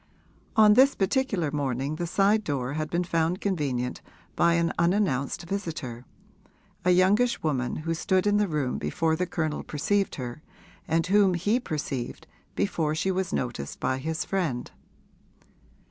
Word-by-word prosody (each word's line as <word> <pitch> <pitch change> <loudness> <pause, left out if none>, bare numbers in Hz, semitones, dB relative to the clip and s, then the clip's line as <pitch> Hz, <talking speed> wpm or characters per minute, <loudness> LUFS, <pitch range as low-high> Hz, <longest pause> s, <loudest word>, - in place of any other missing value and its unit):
On 215 -1 +7
this 265 +5 +5
particular 195 - 0
morning 140 0 -2
the 175 0 -2
side 205 +5 +3
door 140 -5 -2
had 155 0 -3
been 175 +1 0
found 170 +1 0
convenient 140 -10 -2 0.3
by 170 0 +4
an 170 0 +1
unannounced 170 -8 +1
visitor, 155 - -5 0.8
a 180 - +2
youngish 195 +7 +3
woman 130 -6 0
who 165 +2 -2
stood 185 +3 +1
in 205 0 +3
the 210 -1 +2
room 150 -6 -1
before 160 - 0
the 180 +2 -1
Colonel 155 -3 -2
perceived 195 +7 -1
her 125 +2 -6 0.5
and 165 +1 +1
whom 195 -1 +4
he 205 +8 +1
perceived 145 - -4 0.3
before 150 - 0
she 190 +5 0
was 190 0 -1
noticed 120 - -3
by 130 - 0
his 160 +3 -3
friend. 165 -11 -2
165 Hz, 145 wpm, -27 LUFS, 140-190 Hz, 0.8 s, On